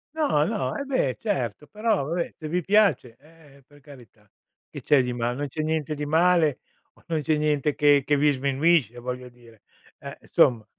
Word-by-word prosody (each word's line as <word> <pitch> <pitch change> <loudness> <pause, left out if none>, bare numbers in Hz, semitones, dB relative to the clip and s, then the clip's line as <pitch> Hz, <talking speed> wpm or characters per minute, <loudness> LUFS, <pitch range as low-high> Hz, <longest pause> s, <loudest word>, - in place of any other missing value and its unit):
No, 285 - +1
no, 210 +5 -2
e 280 - -3
beh 260 - 0
certo. 150 - -3
Però, 215 -7 -1
vabbè, 170 +3 -3
se 155 - -7
vi 180 +2 -1
piace, 195 - +2
eh, 145 -2 -21
per 145 0 -21
carità, 120 -7 -17 0.4
che - - -9
c'è 140 -3 +3
di 125 0 -3
mal 120 0 -2
non 145 - -3
c'è 155 +3 -5
niente 155 -1 -2
di 150 - -4
male 160 -2 +2 0.3
o - - -26
non 160 -2 -1
c'è 155 +1 0
niente 150 -1 0
che 145 -2 +4
che 145 -1 +2
vi 145 +1 +3
sminuisce 135 - +1
voglio 125 +1 -6
dire. 120 -3 -20 0.4
Eh, - - -9
insomma. 115 -4 +2
145 Hz, 190 wpm, -24 LUFS, 125-165 Hz, 0.4 s, che